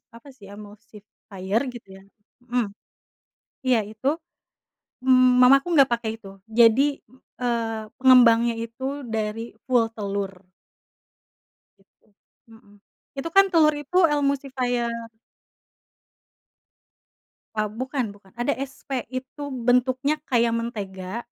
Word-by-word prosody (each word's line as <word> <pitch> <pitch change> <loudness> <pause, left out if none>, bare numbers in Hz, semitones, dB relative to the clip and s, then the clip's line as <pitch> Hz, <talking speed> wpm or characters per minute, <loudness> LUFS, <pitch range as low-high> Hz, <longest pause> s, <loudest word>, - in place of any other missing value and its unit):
apa 270 +4 -14
sih 205 -7 -16
emulsifier 210 -1 -6
gitu 225 -5 -12
ya, - - -18 0.4
mhm, 235 -4 -1 1.0
iya 240 -4 +3
itu, 220 +8 -2 0.9
m 255 -1 +5
mamaku 275 +4 +6
nggak 275 -4 +5
pakai 230 -2 -4
itu, 195 -2 -14 0.2
jadi, 265 +5 +5 0.4
eee, 230 -3 -2
pengembangnya 240 -3 +6
itu 265 +3 -6
dari 225 +1 -4
full 245 -3 +3
telur. 200 -2 -4 1.4
Gitu, 195 - -34 0.5
mhm, 215 -2 -19 0.4
itu 330 +5 -3
kan 390 0 +8
telur 310 -3 +5
itu 360 +6 -3 0.2
emulsifier. 260 -4 -1 2.6
Eee, 215 -1 -1
bukan 255 +1 -3
bukan, 200 0 -17
ada 240 +4 -3
SP 270 -1 -5
itu 255 +3 -7
bentuknya 255 +4 +1
kayak 235 -2 +2
mentega, 205 -2 -5
235 Hz, 100 wpm, -24 LUFS, 215-260 Hz, 2.6 s, kan